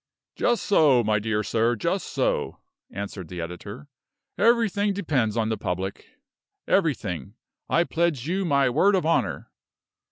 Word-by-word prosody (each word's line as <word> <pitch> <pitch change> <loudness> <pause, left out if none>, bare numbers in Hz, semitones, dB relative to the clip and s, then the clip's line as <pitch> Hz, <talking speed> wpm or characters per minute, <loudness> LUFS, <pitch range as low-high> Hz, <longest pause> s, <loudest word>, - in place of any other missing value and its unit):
"Just 240 -1 +1
so, 145 -10 +4
my 105 -1 +1
dear 105 0 -1
sir, 115 +3 +1
just 105 - -2
so," - - -1 0.3
answered 100 -2 -6
the 90 +2 -7
editor. 100 - -7 0.5
"Everything 220 -3 +2
depends 135 - 0
upon 110 -2 0
the 110 - -1
public 95 0 -5 0.5
everything, 115 - 0 0.3
I 170 - +3
pledge 165 -7 -1
you 190 +3 0
my 140 -6 +2
word 175 +11 +3
of 185 - 0
honor." 165 +1 0
125 Hz, 135 wpm, -25 LUFS, 105-170 Hz, 0.5 s, so